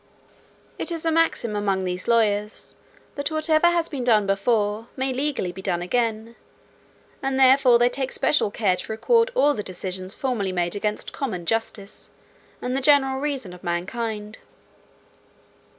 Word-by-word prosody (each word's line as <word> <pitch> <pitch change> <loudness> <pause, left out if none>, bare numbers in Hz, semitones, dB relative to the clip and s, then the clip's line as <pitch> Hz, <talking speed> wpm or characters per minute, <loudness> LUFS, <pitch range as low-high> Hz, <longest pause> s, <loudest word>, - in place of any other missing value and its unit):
"It - - -2
is 330 -1 -4
a 325 - +2
maxim 320 -9 +1
among 195 -2 0
these 180 0 -4
lawyers 210 -2 +1 0.4
that 285 +1 -2
whatever 310 +1 +2
has 345 -1 +2
been 275 -5 -4
done 220 -4 +4
before, 205 +2 0
may 265 0 -1
legally 265 -8 -1
be 190 - -9
done 175 -2 -1
again: 225 +2 -1 0.9
and 270 -1 -1
therefore 260 -2 +6
they 240 +1 +4
take 255 +1 -3
special 295 - +2
care 200 -3 +1
to 180 - -6
record 460 - +2
all 295 -12 +4
the 215 - -3
decisions 185 0 -6
formerly 230 -8 -1
made 175 0 -1
against 210 +1 -3
common 200 -11 -4
justice, 225 -1 -3 0.5
and 250 +1 -1
the 270 - 0
general 270 -1 +4
reason 275 -10 -3
of 180 - -13
mankind. 210 +5 -3
230 Hz, 150 wpm, -24 LUFS, 200-270 Hz, 0.9 s, therefore